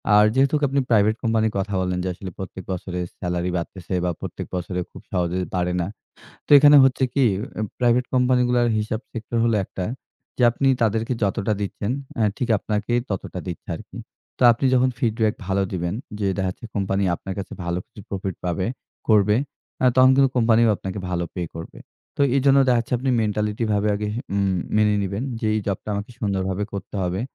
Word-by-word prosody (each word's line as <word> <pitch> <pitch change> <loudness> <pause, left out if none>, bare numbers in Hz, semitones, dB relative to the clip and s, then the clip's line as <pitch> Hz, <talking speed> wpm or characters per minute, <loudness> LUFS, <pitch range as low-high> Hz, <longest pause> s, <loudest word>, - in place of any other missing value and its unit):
আর 105 0 +7
যেহেতুক 140 +3 +3
আপনি 140 +1 +1
প্রাইভেট 110 -1 +4
কোম্পানির 110 -1 +2
কথা 100 +1 -2
বললেন, 90 0 -1
যে - - -2
আসলে 95 +1 -8
প্রত্যেক 95 0 -7
বছরে 90 0 -4 0.2
সেলারি 90 0 -2
বাড়তেছে 90 +2 -6
বা 90 - +1
প্রত্যেক - - -6
বছরে 90 +1 -3
খুব - - -11
সহজে 90 0 0 0.2
বাড়ে 90 0 0
না। 85 - -2 0.6
তো - - -25
এখানে 145 +1 +8
হচ্ছে 130 0 +2
কি, 140 -2 +3 0.5
প্রাইভেট 125 0 +3
কোম্পানিগুলার 125 -1 +3
হিসাব 110 +1 -2
সেক্টর 115 +1 -5
হলো 115 -2 +2
একটা, 95 - -5 0.5
যে 125 - 0
আপনি 135 +3 +1
তাদেরকে 115 +2 +1
যতটা 100 +1 +1
দিচ্ছেন, 100 +1 -3 0.3
অ্যা 110 - +2
ঠিক 125 - -1
আপনাকে 105 +3 -2 0.2
ততটা 95 -2 -4
দিচ্ছে 90 -3 -7
আরকি। - - -11 0.4
তো - - -2
আপনি 115 +4 -1
যখন 130 +1 +4
ফিডব্যাক 110 -2 +1
ভালো 95 0 +1
দিবেন, 90 0 -2 0.3
যে 100 - +1
দেখাচ্ছে 95 +4 -3
কোম্পানি 100 0 0
আপনার 95 +2 -6
কাছে 100 - -6
ভালো 85 +1 -1
কিছু 105 - -13
প্রফিট 95 -2 -3
পাবে, 90 +1 -1 0.4
করবে, 105 -1 +5 0.4
অ্যা 130 - +5
তখন 130 0 +7
কিন্তু 135 -1 +4
কোম্পানিও 115 -1 +4
আপনাকে 95 +1 -5
ভালো 85 -1 -1
পে 90 - -3
করবে। 80 0 -8 0.4
তো - - -6 0.2
এইজন্য 135 0 +5
দেখাচ্ছে 120 -1 +1
আপনি 130 +2 0
মেন্টালিটি 105 +1 -1
ভাবে 105 +1 +1
আগে 105 0 -3 0.3
উম 100 -1 +1 0.2
মেনে 105 -1 +4
নিবেন, 100 +3 -3 0.2
যে - - -1
এই 110 - +1
জবটা 100 +1 -3
আমাকে 100 +4 -4
সুন্দরভাবে 95 -1 -1
করতে 100 +1 -7
হবে। 90 +1 -1
105 Hz, 180 wpm, -23 LUFS, 95-120 Hz, 0.6 s, এখানে